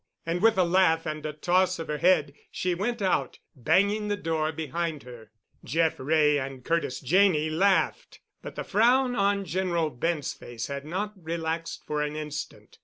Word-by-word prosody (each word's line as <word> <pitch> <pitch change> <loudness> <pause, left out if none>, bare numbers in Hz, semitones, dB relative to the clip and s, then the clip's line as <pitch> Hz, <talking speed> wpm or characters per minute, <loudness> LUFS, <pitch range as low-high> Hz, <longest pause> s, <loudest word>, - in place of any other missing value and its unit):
And, 170 +2 -1
with 225 0 +4
a 185 - +5
laugh 170 -2 +3
and 155 0 -4
a - - -3
toss 180 +4 +1
of 165 - -6
her 150 -1 -3
head, 155 -4 +3 0.2
she 180 -1 -1
went 210 +5 -2
out, 190 - 0 0.2
banging 200 - +2
the 205 0 -1
door 160 -4 -1
behind 160 0 -3
her. 120 -3 -12 0.3
Jeff 160 +4 0
Wray 150 +1 +3
and 130 -1 -7
Curtis 165 -6 -1
Janney 155 0 +3
laughed, 195 - +1 0.2
but - - -9
the - - -4
frown 245 +4 +3
on 200 -1 +1
General 170 -3 -1
Bent's 150 +3 -2
face 115 -2 -7
had 140 0 -5
not 200 +6 -3
relaxed 165 -1 -4
for 150 0 -2
an 150 0 -2
instant. 150 -1 -7
165 Hz, 175 wpm, -27 LUFS, 150-190 Hz, 0.3 s, a